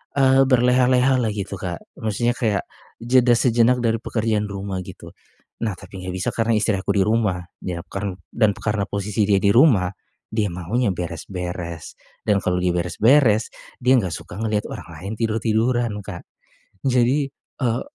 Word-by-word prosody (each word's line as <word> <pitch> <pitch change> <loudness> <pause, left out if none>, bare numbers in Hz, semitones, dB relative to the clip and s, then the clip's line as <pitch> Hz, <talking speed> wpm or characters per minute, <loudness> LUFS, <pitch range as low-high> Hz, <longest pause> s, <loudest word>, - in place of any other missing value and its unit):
eee, 135 -1 +5
berleha-lehalah 125 -1 +3
gitu, 100 0 -4
Kak. 85 -3 -4 0.2
Maksudnya 110 +2 0
kayak, 105 -4 0 0.4
jeda 125 0 +4
sejenak 120 +1 +3
dari 115 -1 +2
pekerjaan 110 -2 -1
rumah 100 -1 -4
gitu. - - -11 0.5
Nah, 105 -5 -1
tapi 95 - -10
enggak 90 0 -4
bisa 90 - -1
karena 115 0 +1
istri 105 -1 +2
aku 100 +2 -1
di 95 - +4
rumah, 105 -5 +1 0.2
ya 85 -2 -4
karn 100 -1 -3 0.2
dan 110 -3 +3
karena 105 -2 -1
posisi 100 +1 -1
dia 100 -1 +4
di 100 - +4
rumah, 120 - +5 0.4
dia 110 -1 0
maunya 100 +7 -1
beres-beres, 90 -1 -5 0.3
dan 100 -2 +3
kalau 90 0 +1
dia 90 -1 +2
beres-beres, 110 - +3 0.3
dia 130 +2 +5
enggak 95 -5 -2
suka - - -9
ngeliat 110 -2 -1
orang - - -7
lain 100 +4 -6
tidur-tiduran, 115 +1 +1
Kak. 95 -3 -8 0.6
Jadi, 130 +3 +2 0.3
eee, 120 -1 +1
110 Hz, 155 wpm, -22 LUFS, 95-120 Hz, 0.6 s, eee